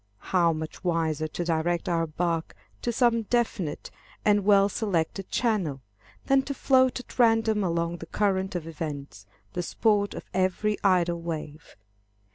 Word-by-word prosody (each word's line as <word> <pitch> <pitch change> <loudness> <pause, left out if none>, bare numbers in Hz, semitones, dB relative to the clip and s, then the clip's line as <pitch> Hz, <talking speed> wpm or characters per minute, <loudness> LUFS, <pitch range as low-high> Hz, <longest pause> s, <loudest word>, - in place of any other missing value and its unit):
How 175 -2 +4
much 155 +2 -6
wiser 160 -3 0
to 175 +3 -4
direct 170 +1 0
our 165 -1 +1
bark 165 +1 -2 0.3
to 240 - -1
some 235 -1 +3
definite 220 -8 -2 0.3
and 205 -1 +4
well 200 0 +5
selected 195 -3 -2
channel, 195 - 0 0.5
than 270 0 +4
to 280 +1 -5
float 260 -1 +3
at 250 - -13
random 225 -3 +4
along 170 -1 -1
the 165 - -9
current 190 -1 0
of 170 -3 -3
events, 145 -9 -6 0.3
the - - -1
sport 205 +3 +1
of - - -7
every 190 +3 0
idle 175 -3 +2
wave. 155 -2 -6
180 Hz, 145 wpm, -27 LUFS, 165-210 Hz, 0.5 s, well